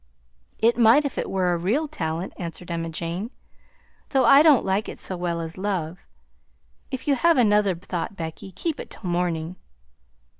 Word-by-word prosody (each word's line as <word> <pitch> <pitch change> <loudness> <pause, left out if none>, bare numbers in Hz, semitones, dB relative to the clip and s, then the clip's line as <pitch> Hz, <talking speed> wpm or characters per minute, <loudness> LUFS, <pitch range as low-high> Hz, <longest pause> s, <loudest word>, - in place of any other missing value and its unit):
"It 235 +2 +2
might 240 +6 +6
if 280 - -3
it - - -3
was 190 -1 -1
a 175 -1 +2
real 225 - 0
talent," 165 - -4
answered 175 0 -7
Emma 165 -1 -3
Jane, 170 +6 -4 0.8
"though 265 -3 +3
I 275 +4 +8
don't 305 -5 +5
like 195 +3 0
it - - -8
so 185 - -3
well 175 -1 -2
as 165 +2 -5
love. 185 -4 -3 0.8
If 260 0 -6
you 285 - +4
have 330 +4 +3
another 210 -5 +3
thought, 175 +3 -5
Becky, 165 +2 -6
keep 305 - -3
it - - -7
till - - -11
morning." 175 -1 -1
190 Hz, 175 wpm, -24 LUFS, 170-240 Hz, 0.8 s, I